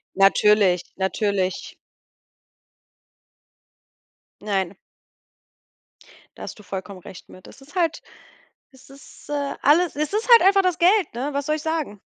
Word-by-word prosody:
Natürlich, 195 -2 +3
natürlich. 190 -1 -2 2.7
Nein. 195 -3 -2 1.6
Da - - -9
hast - - -9
du - - -14
vollkommen 190 0 -7
recht 180 +1 -13
mit. 185 - -15
Es - - -16
ist 280 +6 -18
halt 335 -3 0 0.7
es 265 -1 -19
ist, 275 +2 -17
äh, 285 -1 -3
alles 325 +4 +3
es 305 +3 -2
ist 435 +4 -2
halt 470 - +8
einfach 390 +1 +4
das 365 -3 0
Geld, 375 +3 +3
ne? 260 +5 -3
Was 280 0 -3
soll 305 0 0
ich 305 - -8
sagen? 310 -11 -3
275 Hz, 135 wpm, -22 LUFS, 195-325 Hz, 2.7 s, halt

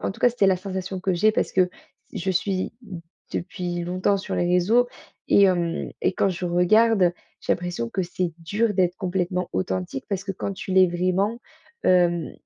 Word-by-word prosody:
en - - -2
tout 225 - -16
cas 245 - +6
c'était 230 -5 +1
la 190 -1 +4
sensation 190 0 -5
que 185 0 0
j'ai 215 +5 +3
parce - - 0
que 185 -1 +3 0.4
je 190 -2 -2
suis 185 +2 -1
d 190 -7 -8 0.3
depuis 175 -1 -3
longtemps 185 +3 +1
sur 190 - -4
les 175 - +1
réseaux 195 +8 +3 0.4
et 200 - +6
hem 175 -3 0
et - - +1
quand 195 - +2
je 180 0 -5
regarde, 180 +2 +4 0.3
j'ai - - +1
l'impression 175 -10 -3
que 190 - -1
c'est 175 0 -2
dur 205 +6 0
d'être 180 -2 +2
complètement 180 -1 -2
authentique, 95 +6 -3
parce 195 -2 -2
que 195 - -4
quand 195 +1 -4
tu 190 - -7
l'es 185 0 +6
vraiment, 185 +6 0 0.4
hem, 175 -2 +3
185 Hz, 190 wpm, -24 LUFS, 175-195 Hz, 0.4 s, cas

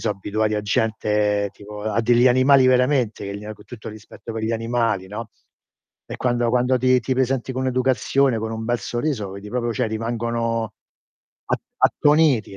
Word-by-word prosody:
so' 115 - 0
abituati 105 +2 -1
a 105 - 0
gente 105 -1 0
tipo 105 +1 -10
a 110 +2 0
degli 120 +2 +5
animali 130 +1 +5
veramente, 125 -4 +2
che 100 0 -5
gli 105 - -11
ha 110 - -6
co' 105 - -17
tutto 110 +1 -11
il 110 - -8
rispetto 110 +1 -11
per 110 0 -4
gli 110 - -1
animali, 115 -4 -1
no, 110 +2 -7 0.8
e - - -6
quando 120 -2 +1
quando 125 +1 +2
ti 130 0 +3
ti 130 +2 -1
presenti 130 0 0
con 130 +1 -2
educazione, 130 0 +2
con 110 0 -4
un 110 0 -4
bel 120 +1 0
sorriso, 120 -3 -2
vedi 100 +1 -9
proprio 120 -1 -1
cioè, 110 - 0
rimangono 115 0 -2 0.7
a - - +1 0.3
attoniti, 145 -10 +2
115 Hz, 180 wpm, -22 LUFS, 110-125 Hz, 0.8 s, degli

